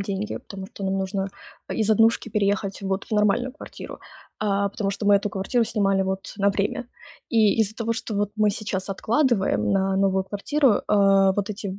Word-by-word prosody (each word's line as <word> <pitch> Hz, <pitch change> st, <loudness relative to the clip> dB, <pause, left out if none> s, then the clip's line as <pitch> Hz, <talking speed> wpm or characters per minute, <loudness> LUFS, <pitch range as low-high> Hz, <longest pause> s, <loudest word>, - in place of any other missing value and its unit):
деньги, 195 Hz, +1 st, -3 dB
потому 190 Hz, -1 st, -9 dB
что -, -, -9 dB
нам 190 Hz, 0 st, 0 dB
нужно 195 Hz, 0 st, -2 dB, 0.4 s
из 220 Hz, -1 st, 0 dB
однушки 225 Hz, +1 st, +3 dB
переехать 200 Hz, -1 st, 0 dB
вот 195 Hz, 0 st, -2 dB
в -, -, -22 dB
нормальную 210 Hz, +5 st, +2 dB
квартиру, 295 Hz, -, -10 dB, 0.4 s
а, 200 Hz, -1 st, +1 dB
потому 200 Hz, 0 st, -3 dB
что 200 Hz, +1 st, -5 dB
мы 205 Hz, -1 st, +7 dB
эту 205 Hz, +1 st, -1 dB
квартиру 215 Hz, +5 st, 0 dB
снимали 195 Hz, -3 st, +1 dB
вот 190 Hz, 0 st, -4 dB
на 200 Hz, 0 st, +3 dB
время. 205 Hz, +5 st, -2 dB, 0.4 s
И 220 Hz, -1 st, +3 dB
из-за 215 Hz, 0 st, 0 dB
того, 230 Hz, 0 st, -1 dB
что 225 Hz, -1 st, -4 dB
вот 205 Hz, 0 st, 0 dB
мы 215 Hz, -1 st, +3 dB
сейчас 205 Hz, -2 st, -3 dB
откладываем 195 Hz, -, +1 dB
на 195 Hz, 0 st, +1 dB
новую 190 Hz, -1 st, +2 dB
квартиру, 230 Hz, +5 st, +1 dB
э, -, -, -4 dB, 0.5 s
вот 205 Hz, +1 st, -1 dB
эти 200 Hz, -1 st, -5 dB
200 Hz, 185 wpm, -24 LUFS, 195-215 Hz, 0.5 s, мы